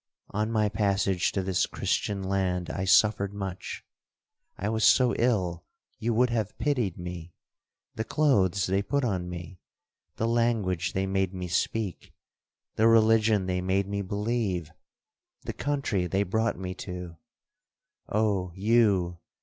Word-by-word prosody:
On 110 +2 -1
my 110 -2 +2
passage 100 -3 +1
to 95 - -1
this 95 -1 +1
Christian 100 -1 -1
land, 95 -3 -1
I 95 - -3
suffered 100 0 +3
much. 95 -2 -6 0.7
I 100 - -3
was 110 0 0
so 125 -2 +5
ill 95 -9 +1 0.4
you 120 - 0
would 120 +2 +2
have 110 -3 -2
pitied 125 - 0
me—the 90 +5 -9
clothes 100 - +2
they 95 +1 +1
put 140 +5 0
on 90 -6 -2
me—the 90 +5 -8
language 115 -7 0
they 95 0 0
made 95 -1 -1
me 90 -1 -4
speak—the 105 +3 -3
religion 110 -2 +4
they 90 0 -1
made 95 +1 0
me 100 0 -2
believe—the 100 -5 -2 0.8
country 135 -11 -1
they 95 +4 +1
brought 110 +4 0
me 90 0 -4
to—Oh 90 +2 -5
you! 100 -5 +2
100 Hz, 125 wpm, -27 LUFS, 90-110 Hz, 0.8 s, so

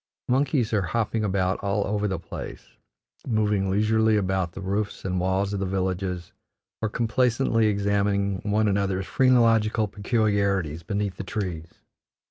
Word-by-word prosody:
Monkeys 130 -2 +1
are 105 - +3
hopping 110 +3 -1
about 95 -2 0
all 100 +1 0
over 105 +1 0
the 95 -3 -2
place, 85 0 -9 0.5
moving 105 -4 +1
leisurely 110 +2 +3
about 95 -3 -1
the - - -8
roofs 100 +2 -3
and 90 -1 -1
walls 95 +2 0
of 100 - -2
the 95 - -1
villages, 90 -2 -2 0.5
or 110 - 0
complacently 115 0 +1
examining 100 -1 +1
one 105 +1 +1
another's 95 -1 0
phrenological 115 -4 +3
peculiarities 100 -6 0
beneath 100 +2 -3
the - - -4
trees. 90 -5 -5
100 Hz, 135 wpm, -25 LUFS, 95-110 Hz, 0.5 s, are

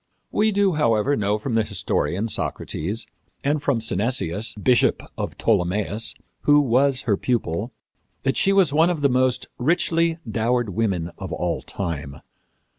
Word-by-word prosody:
We 215 +1 +2
do, 200 -1 +2
however, 120 -2 +2
know 105 -2 0
from 115 +3 -4
the 115 0 +3
historian, 105 0 -1
Socrates, 105 0 -3 0.4
and 145 +1 +1
from 140 -5 +1
Synesius, 110 -2 0
bishop 120 +4 +2
of - - -5
Ptolemais, 105 +1 +1 0.3
who 145 0 +5
was 135 0 +2
her 110 -6 +2
pupil, 110 -2 -1 0.5
that 135 0 +1
she 195 - +2
was 190 -7 +3
one 160 +3 +4
of 170 -4 -2
the 140 - +4
most 130 0 +1
richly 165 +3 +1
dowered 115 +1 0
women 95 -5 -1
of 95 -2 -6
all 85 -2 -2
time. 75 -7 -4
115 Hz, 145 wpm, -23 LUFS, 100-145 Hz, 0.5 s, who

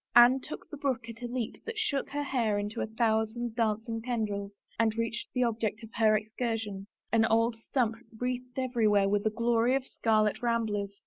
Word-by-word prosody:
Anne 240 +2 +8
took 300 - -8
the 295 - -6
brook 260 -5 -1
at 230 +1 -9
a 240 - -3
leap 240 -2 -4
that 455 -1 -6
shook 300 -11 0
her 290 0 -2
hair 235 -7 +1
into 205 +1 -3
a - - -1
thousand 220 +1 0
dancing 225 0 0
tendrils 215 -4 -2 0.3
and 225 -1 +2
reached 230 0 -2
the 250 - +2
object 225 -1 -1
of 225 - -11
her 215 -1 +4
excursion, 215 -2 -3 0.2
an 225 -1 +4
old 230 +1 +3
stump 230 0 -1 0.2
wreathed 250 0 -3
every 245 -4 +1
where 200 -1 +4
with 205 +1 +1
a - - +4
glory 235 +2 +2
of 270 -1 -1
scarlet 215 -3 +1
ramblers. 210 -4 -1
230 Hz, 190 wpm, -30 LUFS, 215-245 Hz, 0.3 s, Anne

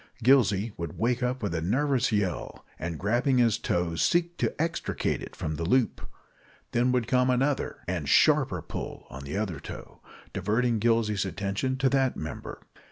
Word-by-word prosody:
Gillsey 115 -5 +4
would 85 -3 -5
wake 120 +2 +1
up 125 0 -1
with 100 - -1
a 80 - -1
nervous 130 - +1
yell, 105 -4 -2
and 85 0 -4
grabbing 120 - +1
his 115 -4 +3
toe, 85 -1 0
seek 175 - +1
to - - -1
extricate 165 +1 -1
it - - -9
from 80 -1 -3
the 85 - -3
loop. 115 +5 +2 0.7
Then 120 +1 +2
would 125 -2 +1
come 125 +1 +2
another 135 +3 0
and 85 -6 -2
sharper - - +4
pull - - -6
at 65 - -8
the 70 +7 -5
other 95 -8 -2
toe, - - -10 0.3
diverting 115 +1 +1
Gillsey's 110 -2 +2
attention 100 +7 -2
to 135 0 +2
that 135 -2 +1
member. 80 - -7
115 Hz, 165 wpm, -28 LUFS, 95-130 Hz, 0.7 s, Gillsey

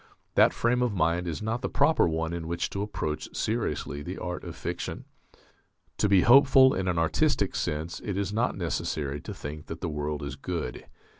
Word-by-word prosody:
That - - +6
frame 125 +1 +1
of 120 -4 +1
mind 85 +1 +1
is 85 +5 -4
not 115 +3 -1
the - - -2
proper 160 - +3
one 80 0 -1
in 85 -1 -4
which 85 +1 -2
to 100 - -3
approach 80 -7 -4
seriously 105 - -2
the - - -6
art - - -4
of - - -7
fiction.... - - -5 0.9
To 105 - +2
be 95 -2 +6
hopeful 130 +2 +7
in 95 0 -2
an 90 -2 0
artistic 80 -1 +1
sense 80 +3 -2
it 100 -3 -3
is 100 0 -1
not 115 +1 0
necessary 75 -5 -2
to - - -7
think 75 +1 -7
that 80 - -6
the 90 - -2
world 75 0 -3
is 70 -2 -5
good. 75 -3 -5
85 Hz, 195 wpm, -28 LUFS, 75-105 Hz, 0.9 s, hopeful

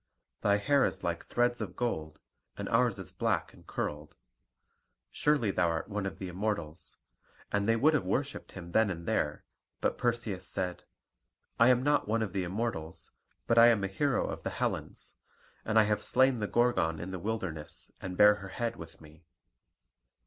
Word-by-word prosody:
Thy 100 0 +3
hair 140 +7 +3
is - - -1
like - - -2
threads 120 0 0
of 95 -5 -5
gold, 80 -11 -3 0.4
and - - -4
ours - - +3
is - - -7
black - - -1
and - - -19
curled. 75 0 -4 1.0
Surely 145 -9 +2
thou 90 -2 +2
art 85 +3 -2
one 105 -1 -2
of - - -6
the 95 - -5
Immortals"; 90 -4 -4 0.5
and 100 +1 +1
they 115 - +5
would 150 +7 +4
have 150 - +2
worshipped 140 +2 -2
him 85 -2 -9
then 110 +2 +3
and 85 -3 -5
there; 75 -2 -1 0.3
but - - -1
Perseus 115 -6 -1
said: 90 -1 -3 0.7
"I 115 - +7
am 125 0 +4
not 145 -4 +2
one 110 +1 +1
of 105 - -5
the 95 -2 0
Immortals; 90 -4 -4 0.3
but 115 0 +4
I 115 - +9
am 110 -4 +4
a - - +1
hero 135 +7 0
of - - -5
the - - -3
Hellens. - - -4 0.5
And 110 0 0
I 110 - +8
have 105 0 0
slain 130 0 +3
the 105 -2 -2
Gorgon 120 -11 +2
in 90 +3 -5
the 95 - -4
wilderness, 95 -6 -4
and 90 -1 -5
bear 105 0 +8
her 100 -1 -8
head 115 +3 -3
with 80 +3 -11
me. 80 +2 -17
105 Hz, 185 wpm, -31 LUFS, 90-120 Hz, 1.0 s, I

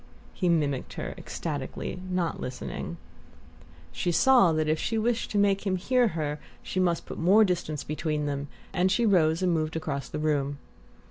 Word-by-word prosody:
he 180 - 0
mimicked 145 -6 0
her - - -4
ecstatically, 180 - -5
not 180 -2 -1
listening. 125 0 -5 0.9
She 175 - -1
saw 245 -2 +5
that 155 -1 0
if 155 0 +1
she 225 - -1
wished 230 +1 0
to 210 - -1
make 200 -1 +3
him 190 - +2
hear 245 +6 +2
her 150 -1 -2 0.2
she 185 - -3
must 175 -2 +1
put - - -7
more 200 +6 +6
distance 160 -5 -2
between 150 0 -2
them, 140 0 -2 0.3
and 185 0 +2
she 235 +4 +2
rose 170 -4 +3
and 180 -2 +3
moved 155 -1 -1
across 145 -4 -3
the - - -4
room. 145 -2 0
170 Hz, 175 wpm, -27 LUFS, 150-190 Hz, 0.9 s, more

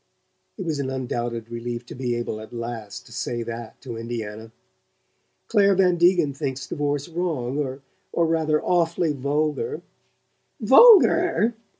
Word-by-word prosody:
(It 190 - -5
was 155 -3 -2
an 135 -2 -2
undoubted 120 -3 -4
relief 120 0 -5
to - - -10
be 125 -2 -2
able, 120 -2 -4
at 110 - -11
last, 115 -3 -6
to - - -17
say 120 0 -3
that 115 -1 -7
to 120 -4 -7
Indiana!) 110 -1 -6 1.0
"Clare 200 -3 +4
Van 180 -2 +3
Degen 175 -4 +3
thinks 135 -2 -4
divorce 145 0 -2
wrong 145 -6 -3 0.3
or 170 - +1
rather 160 -2 +1
awfully 170 -2 +1
vulgar." 150 - -2 0.8
"VULGAR?" 335 - +6
140 Hz, 130 wpm, -24 LUFS, 120-170 Hz, 1.0 s, VULGAR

